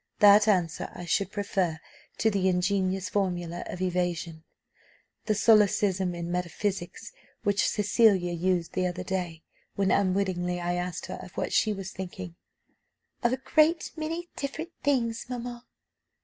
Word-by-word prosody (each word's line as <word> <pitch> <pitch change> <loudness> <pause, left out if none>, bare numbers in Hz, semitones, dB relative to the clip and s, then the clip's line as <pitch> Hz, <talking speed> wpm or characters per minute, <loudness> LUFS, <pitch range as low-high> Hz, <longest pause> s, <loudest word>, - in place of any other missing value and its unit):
That 205 +1 +7
answer 180 -6 +1
I 175 - -7
should 195 +4 0
prefer 190 -6 -1 0.4
to 220 - +2
the 195 -2 +1
ingenious 185 +1 0
formula 175 -3 -2
of 185 - -4
evasion, 175 -3 -2 0.8
the 215 - +1
solecism 200 -4 +3
in 170 0 -4
metaphysics, 180 - -3 0.3
which 205 0 +2
Cecilia 205 -4 +3
used 175 0 0
the 185 -1 +1
other 180 +1 -4
day, 180 -3 -3 0.3
when 195 -1 +1
unwittingly 185 -2 +1
I 175 0 -1
asked 175 0 -3
her - - -6
of - - -12
what - - -2
she 215 - +3
was 195 -2 -5
thinking 185 -1 -7 0.9
'Of 240 +1 +2
a - - 0
great 315 +4 +2
many 325 +2 -4
different 315 +5 -4
things, 235 -6 0
mamma. 245 0 -6
190 Hz, 140 wpm, -28 LUFS, 175-210 Hz, 0.9 s, That